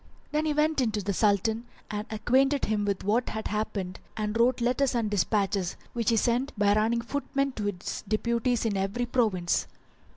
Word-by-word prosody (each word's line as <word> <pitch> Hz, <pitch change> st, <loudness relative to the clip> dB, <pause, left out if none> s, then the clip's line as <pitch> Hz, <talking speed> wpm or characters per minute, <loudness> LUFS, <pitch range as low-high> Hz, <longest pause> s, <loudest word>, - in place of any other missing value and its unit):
Then 305 Hz, +1 st, 0 dB
he 300 Hz, -, +1 dB
went 300 Hz, -1 st, +2 dB
in 240 Hz, -, +2 dB
to 210 Hz, -1 st, -2 dB
the 200 Hz, +1 st, -1 dB
Sultan 220 Hz, +4 st, +1 dB, 0.2 s
and 210 Hz, 0 st, -3 dB
acquainted 265 Hz, +6 st, +2 dB
him 210 Hz, -1 st, 0 dB
with 200 Hz, -2 st, -1 dB
what 225 Hz, +5 st, +1 dB
had 220 Hz, 0 st, -4 dB
happened 200 Hz, -3 st, -3 dB, 0.2 s
and 210 Hz, 0 st, -2 dB
wrote 240 Hz, +2 st, +3 dB
letters 250 Hz, +2 st, +1 dB
and 225 Hz, -3 st, 0 dB
dispatches, 195 Hz, -1 st, +1 dB, 0.2 s
which 230 Hz, -3 st, 0 dB
he 230 Hz, -, +3 dB
sent 240 Hz, +3 st, +1 dB
by 205 Hz, 0 st, +4 dB
running 225 Hz, +3 st, +2 dB
footmen 275 Hz, +2 st, -1 dB
to 215 Hz, -5 st, -4 dB
his 200 Hz, -2 st, -4 dB
deputies 235 Hz, +3 st, 0 dB
in 215 Hz, -3 st, 0 dB
every 195 Hz, +6 st, -1 dB
province. 215 Hz, -8 st, +1 dB
220 Hz, 185 wpm, -28 LUFS, 205-245 Hz, 0.2 s, by